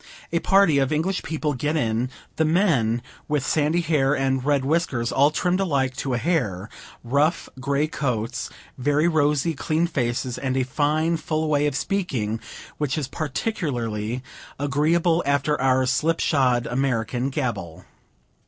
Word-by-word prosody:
A 170 - +3
party 190 -4 +4
of 135 0 +1
English 170 +5 0
people 155 -1 -2
get 145 +4 -1
in 120 -3 0 0.3
the 160 - +3
men, 155 - +2 0.2
with 150 -3 0
sandy 155 +3 +2
hair 145 -4 +2
and 135 -1 0
red 140 -1 +1
whiskers, 140 -6 0
all 140 +2 +4
trimmed 180 +4 0
alike, 140 -8 0
to 130 -3 -1
a - - +1
hair; 110 - -1 0.3
rough 140 +7 +1
grey 140 +3 +1
coats, 125 -7 -2 0.3
very 145 +5 +2
rosy, 155 0 +2
clean 155 +3 0
faces, 125 -5 -2
and 130 -1 -1
a 130 - +2
fine, 155 +5 +1
full 155 -1 -2
way 150 -1 +2
of 145 - -2
speaking, 130 - -1 0.4
which 150 0 -1
is 145 -4 -2
particularly 130 - -3 0.3
agreeable, 160 +5 +2
after 140 0 +1
our 130 0 +3
slip 155 +6 +1
shod 125 -5 +2
American 125 0 -1
gabble. 120 - -4
145 Hz, 145 wpm, -24 LUFS, 125-155 Hz, 0.4 s, party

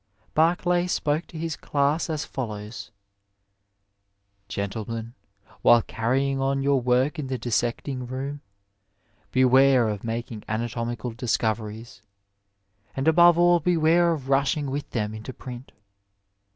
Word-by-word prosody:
Barclay 175 +2 +2
spoke 155 -1 -1
to 165 - -10
his 165 -1 -3
class 145 +4 0
as 155 -2 -2
follows: 110 -3 -6 0.8
" 100 0 -48
Gentlemen, 110 +3 -4 0.5
while 120 -1 +6
carrying 135 +4 -1
on 135 0 0
your 140 -1 +2
work 125 +6 +1
in 140 - -3
the 130 0 -2
dissecting 120 +2 -2
room, 135 +3 -5 0.9
beware 130 -1 +5
of 105 -2 -4
making 115 -1 -4
anatomical 115 +2 -3
discoveries; 110 -2 -3 0.9
and 135 +3 -2
above 170 +1 +6
all 175 0 +5
beware 170 +1 +3
of 145 -5 -4
rushing 140 +1 +1
with 145 +1 -4
them 105 -2 -2
into 110 +4 -7
print. 125 +1 -9
130 Hz, 120 wpm, -25 LUFS, 115-145 Hz, 0.9 s, while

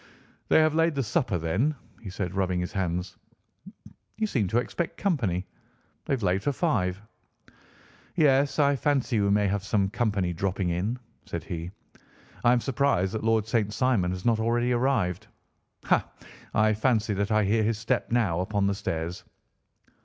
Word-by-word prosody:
"They - - +5
have 155 -1 +3
laid 165 0 +2
the 135 - 0
supper, 115 - 0
then," 95 - 0 0.3
he 105 - -7
said, 90 -1 -4
rubbing 95 -2 0
his 90 - -3
hands. 90 -1 -2 1.0
"You 220 - +1
seem 120 - 0
to 110 - 0
expect 165 +7 -2
company. 110 - 0 0.6
They - - -1
have 125 -5 -1
laid 95 +1 +1
for 145 - 0
five." 105 - 0 1.2
"Yes, 140 -4 +3
I 145 -2 +4
fancy 135 -5 +1
we 100 - +2
may 105 +1 +3
have 100 0 -1
some 100 -1 0
company 105 -6 0
dropping 95 +1 -1
in," 95 +8 -1 0.3
said - - -4
he. 85 0 -5 0.7
"I 120 - +5
am 125 -1 +3
surprised 125 -9 +1
that 110 - -3
Lord 110 -1 +2
St. 110 -3 0
Simon 115 -7 +1
has 90 0 -5
not 115 -2 +3
already 120 +2 +1
arrived. 120 -8 0 0.6
Ha! - - +3 0.5
I 110 0 +4
fancy 110 -1 +1
that 100 +2 -1
I 110 0 +3
hear 110 +3 +2
his 110 0 +1
step 110 +1 -1
now 105 -8 +1
upon 100 +2 0
the 100 - +2
stairs." 85 -2 -4
110 Hz, 170 wpm, -27 LUFS, 95-125 Hz, 1.2 s, They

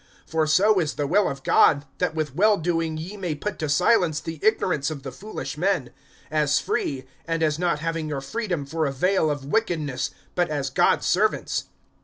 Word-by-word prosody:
(15)For 160 -1 +1
so 200 +5 +4
is 155 -3 -1
the 145 - -1
will 190 +7 +3
of 140 -1 -7
God, 145 -1 +4
that 180 -3 0
with 155 -4 -2
well 205 +6 +4
doing 165 -2 -1
ye 175 +6 -6
may 175 -6 -3
put 210 +8 -5
to 155 - -2
silence 165 0 +3
the 165 -1 -7
ignorance 180 -9 +1
of 145 -4 -7
the 135 - -6
foolish 200 - -7
men; 175 -9 0 0.4
(16)as 150 -2 +2
free, 130 -2 -2 0.2
and 165 -1 0
as 155 0 +1
not 170 -4 0
having 165 -1 -2
your 145 -2 -2
freedom 175 +1 -3
for 160 +2 -1
a - - -1
vail 170 +4 +1
of 145 -2 -3
wickedness, 150 - -1 0.2
but 175 -2 +1
as 140 -3 -2
God's - - +3
servants. 205 +7 +1
160 Hz, 195 wpm, -24 LUFS, 145-180 Hz, 0.4 s, so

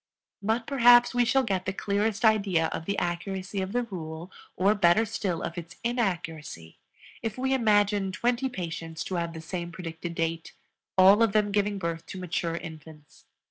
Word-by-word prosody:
But 225 +3 0
perhaps 245 -3 +6
we 245 0 +3
shall 270 +3 +3
get 190 -5 -2
the 190 - 0
clearest 205 +3 0
idea 195 -7 +3
of 165 - -5
the 200 +2 -2
accuracy 190 +3 -3
of 190 +1 -4
the 245 +2 0
rule, 170 -4 -7 0.3
or 195 +3 +4
better 200 +2 +4
still 200 -6 -3
of 170 +1 -4
its 170 0 -11
inaccuracy, 170 - -3 0.4
if 225 -1 -4
we 265 +1 0
imagine 205 -5 +2
twenty 240 +6 0
patients 165 -6 -5
to 185 - -4
have 170 -1 -2
the 160 - -7
same 170 +1 -5
predicted 170 -1 -6
date, 165 0 -2 0.4
all 195 +4 +7
of 225 -3 +3
them 210 -1 +2
giving 205 0 +1
birth 170 -3 -4
to - - -7
mature 170 -2 -2
infants. 160 -3 -11
190 Hz, 175 wpm, -27 LUFS, 170-220 Hz, 0.4 s, all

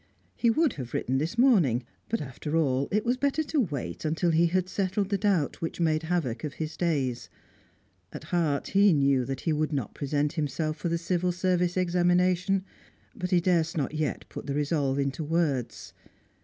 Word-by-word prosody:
He 235 - +2
would 310 +6 +2
have 125 -4 -7
written 130 +2 0
this 165 +10 -3
morning, 180 - +4 0.3
but, 230 - -1
after 150 +3 -3
all, 140 -3 +1
it 210 +2 +1
was 245 +2 +1
better 280 +4 +1
to 295 -1 0
wait 140 - -4
until 165 +2 +1
he 165 +2 +4
had 180 +1 0
settled 195 +1 -1
the 200 - +1
doubt 190 -8 0
which 165 - -4
made 155 -2 +2
havoc 160 -8 -2
of 150 -2 -4
his 155 0 -4
days. 135 -8 -1 0.8
At - - -8
heart 160 -5 0
he 200 -1 +5
knew 140 -3 +3
that 135 0 -4
he 160 - 0
would 155 +1 0
not 135 -8 -3
present 145 +1 -1
himself 155 0 -2
for 170 - -2
the 170 - +1
Civil 180 +1 0
Service 180 0 0
examination; 180 +1 +2 0.5
but 180 -5 -3
he 180 - +4
durst 170 -2 +1
not 145 0 -1
yet 155 -2 -2
put - - -8
the 140 - -2
resolve 145 -2 0
into 140 +2 -1
words. 150 -6 -1
165 Hz, 185 wpm, -27 LUFS, 145-180 Hz, 0.8 s, he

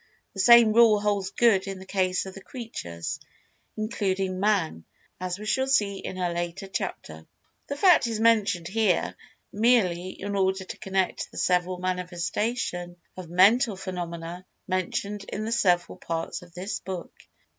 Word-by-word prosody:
The 195 - -8
same 235 +2 +7
rule 225 -2 +6
holds 205 -2 0
good 200 -2 +3
in 195 -1 -4
the 190 - -11
case 185 -1 0
of 190 - -8
the 195 - -10
Creatures, 140 - -6 0.6
including 195 -4 -1
Man, 190 - +1 0.4
as 185 0 -3
we 210 - -8
shall 265 +5 +1
see 205 -7 +2
in 185 - -6
a 175 -2 -1
later 175 +2 -4
chapter. 80 - -5 0.4
The 280 - -3
fact 355 -7 +5
is 225 -2 -2
mentioned 215 -7 +3
here, 200 -3 +1 0.4
merely 200 -6 +2
in 200 +1 -5
order 190 0 +1
to 185 - -8
connect 195 -3 -1
the - - -13
several 180 0 +1
manifestation 180 +1 -2 0.2
of 185 -3 -8
Mental 205 +6 +5
Phenomena 175 -2 -6 0.2
mentioned 195 +2 -2
in 215 +1 -4
the 225 - -3
several 180 -6 +1
parts 165 -1 -4
of 175 -1 -16
this 190 +4 -4
book. 185 -1 -6
190 Hz, 155 wpm, -26 LUFS, 180-215 Hz, 0.6 s, same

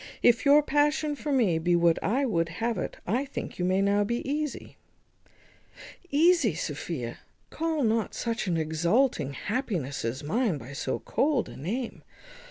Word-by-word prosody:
If 240 +2 +4
your 290 +1 +6
passion 295 +1 +1
for 295 +1 -4
me 215 -12 +3
be 175 +2 +2
what 170 -1 +3
I 260 +7 +1
would 165 -9 0
have 225 +4 -2
it, - - -4
I 240 +9 0
think 280 -8 -7
you 180 - +1
may 185 +2 +2
now 200 +1 +3
be 235 +5 -2
easy." 300 +1 -3 1.3
"Easy! 300 - +4
Sophia, 145 -6 -4 0.3
call 320 -2 -1
not 225 -1 0
such 230 -3 -2
an 170 -2 +1
exulting 160 - +1
happiness 190 - -3
as 115 +5 -3
mine 205 - 0
by 135 +1 -10
so 140 - -2
cold 280 -4 0
a - - -10
name. 225 - -4
220 Hz, 160 wpm, -27 LUFS, 165-275 Hz, 1.3 s, your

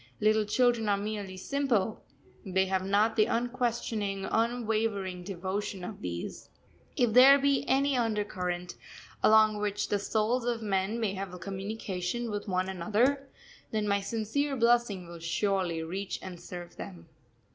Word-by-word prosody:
Little 215 0 +3
children 235 0 +2
are 200 - +3
merely 200 -2 -4
simple, 230 -3 0 0.4
they 190 -1 +1
have 190 0 0
not 205 +3 +2
the 215 -1 +4
unquestioning, 230 -5 -1
unwavering 220 -5 0
devotion 190 +1 -4
of 200 +3 -7
these. 85 -1 -5 0.5
If 240 -3 +2
there 265 +3 +9
be 280 -1 +2
any 275 +1 +3
undercurrent 190 -6 -1 0.5
along 215 -1 +5
which 205 0 -1
the 205 - +1
souls 220 +4 0
of 235 -1 -1
men 200 +2 0
may 215 -4 0
have 190 -2 -6
communication 195 +2 -4
with 205 +1 -4
one 185 -1 0
another, 225 +10 +1 0.4
then 215 -1 -1
my 200 0 +2
sincere 230 +7 -1
blessing 235 -6 +2
will 170 0 -9
surely 170 0 0
reach 190 +4 -4
and 180 -2 -8
serve 175 0 -9
them. 175 -4 -9
210 Hz, 140 wpm, -30 LUFS, 190-230 Hz, 0.5 s, there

